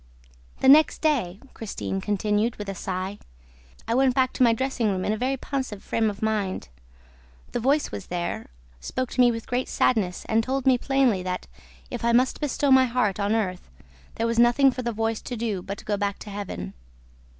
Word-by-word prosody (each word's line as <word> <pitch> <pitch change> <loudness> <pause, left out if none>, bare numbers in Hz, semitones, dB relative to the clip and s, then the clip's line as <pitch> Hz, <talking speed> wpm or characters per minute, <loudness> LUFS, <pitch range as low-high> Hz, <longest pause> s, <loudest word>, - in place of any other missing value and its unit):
"The - - +3
next 300 +4 +6
day," 235 - +1
Christine 195 -3 -4
continued, 210 +3 0
with 210 - -7
a - - -2
sigh, 190 +1 -4 0.7
"I 230 - 0
went 260 0 +3
back 260 -1 +2
to - - -5
my 240 -2 +6
dressing 245 -1 0
room 185 -2 -1
in 210 - +1
a - - -2
very 260 +4 -1
pensive 260 -7 -4
frame 225 -1 +1
of 205 +1 -7
mind. 205 - -1 0.8
The - - -1
voice 280 +5 +1
was 100 - -7
there, 175 -10 -4 0.3
spoke 255 - -3
to 255 - +2
me 245 -1 +6
with 230 -1 -5
great 250 +1 -1
sadness 195 -7 +1
and 225 +1 +2
told 265 +2 -2
me 260 -2 +4
plainly 265 -8 +2
that, 180 0 -4 0.5
if - - -5
I 235 0 +2
must 255 +5 +2
bestow 290 -1 0
my 260 0 +7
heart 235 -6 0
on 205 +2 +1
earth, 185 -5 -2 0.5
there 225 - -1
was 230 0 0
nothing 240 +3 +5
for 255 - -5
the 240 -1 -2
voice 225 0 -1
to 245 - -6
do 215 -5 -2
but 200 +2 -6
to - - -13
go 205 -1 0
back 200 0 -1
to 205 - -8
Heaven. 195 - -6
225 Hz, 205 wpm, -25 LUFS, 200-255 Hz, 0.8 s, my